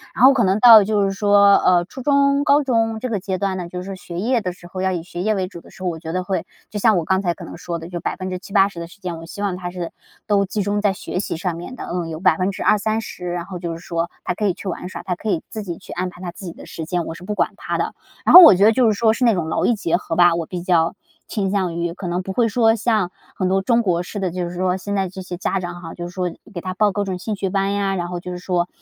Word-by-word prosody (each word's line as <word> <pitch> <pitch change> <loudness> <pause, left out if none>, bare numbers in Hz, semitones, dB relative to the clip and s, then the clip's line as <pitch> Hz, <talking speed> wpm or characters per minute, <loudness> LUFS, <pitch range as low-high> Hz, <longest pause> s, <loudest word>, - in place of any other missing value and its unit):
然 245 - +5
后 270 - +8
可 245 - +2
能 195 +2 +2
到 225 -3 +9
就 210 0 +1
是 195 - 0
说 200 0 +5
呃 175 -1 +3
初 260 - -9
中 280 +1 +3
高 285 0 +4
中 225 -4 +1
这 255 - -3
个 210 -4 -1
阶 190 0 -3
段 195 -1 -1
呢， 175 -1 -5
就 180 - -5
是 180 - -8
说 195 -1 -6
学 175 -1 -7
业 235 +3 +1
的 185 - -2
时 175 -1 -14
候， 185 +1 -6
要 190 0 +1
以 175 -2 -2
学 175 0 -6
业 215 +2 +1
为 190 -2 -1
主 170 -3 -11
的 - - -17
时 - - -16
候， 180 - +1
我 165 - -4
觉 160 0 -6
得 185 +1 -1
会 190 0 -2 0.2
就 210 - -5
像 215 -2 +4
我 165 - -1
刚 190 +2 +1
才 175 -3 0
可 - - -10
能 - - -9
说 170 -1 -4
的 165 - -8
就 175 -1 -5
70-80% 185 +1 -1
的 170 - -6
时 200 - -17
间， 175 -3 -5
我 165 - -9
希 200 - -8
望 200 -3 -1
他 180 -1 -5
是 175 -2 -5 0.4
都 200 -1 +3
集 205 +2 -2
中 205 +1 0
在 205 -1 +3
学 185 - -4
习 180 - -3
上 180 -1 -2
面 175 +10 -8
的， - - -7
嗯， 175 -2 -3
有 160 0 -5
20-30%， 190 +2 0
然 175 -1 -3
后 180 -2 -7
就 170 -1 -4
是 165 - -7
说 170 0 -3
他 180 - -1
可 210 +3 -2
以 190 - +2
去 195 - -9
玩 180 0 -4
耍， - - -8
他 180 -2 -2
可 215 - -5
以 165 - 0
自 215 - -5
己 175 -4 -5
去 - - -13
安 180 +1 -2
排 180 0 -14
他 175 - -5
自 185 +2 -11
己 170 - -6
的 - - -12
时 160 - -7
间， 175 0 -2
我 - - -5
是 175 - -12
不 210 +2 -3
管 - - +1
他 - - -3
的。 - - -2 0.3
然 - - +4
后 365 - +14
我 320 - +10
觉 195 +3 +4
得 220 - +7
就 245 0 +3
是 205 - -2
说 220 -1 +4
是 250 - -2
那 230 - +5
种 165 -3 -2
劳 - - 0
逸 240 - +3
结 170 -5 0
合 165 - -4
吧， 175 -1 +5
我 165 -1 -2
比 180 0 -5
较 170 -2 +2 0.3
倾 195 -4 -1
向 185 -4 0
于。 170 0 -2
可 180 0 -7
能 175 +1 -1
不 190 - -5
会 235 +1 +2
说 225 0 +3
像 215 -5 0 0.2
很 185 - 0
多 195 +1 +2
中 235 +3 +2
国 180 -5 0
式 205 +3 -6
的， 185 -2 -1
就 175 0 -3
是 180 - -8
说 185 +1 0
现 200 +2 -4
在 190 -2 0
这 190 +1 -8
些 180 -1 -6
家 190 +1 -1
长 175 -1 -6
哈， 165 -2 -8
就 175 0 -6
是 175 - -11
说 180 -2 -2 0.2
给 175 - -4
他 185 0 -4
报 205 +1 +2
各 205 +1 -1
种 190 -2 -3
兴 210 +3 -4
趣 195 -1 -2
班 195 0 0
呀， 195 -1 0
然 175 -1 -2
后 175 0 -4
就 180 - -7
是 180 - -5
说 180 -1 0
185 Hz, 335 characters per minute, -21 LUFS, 175-205 Hz, 0.4 s, 后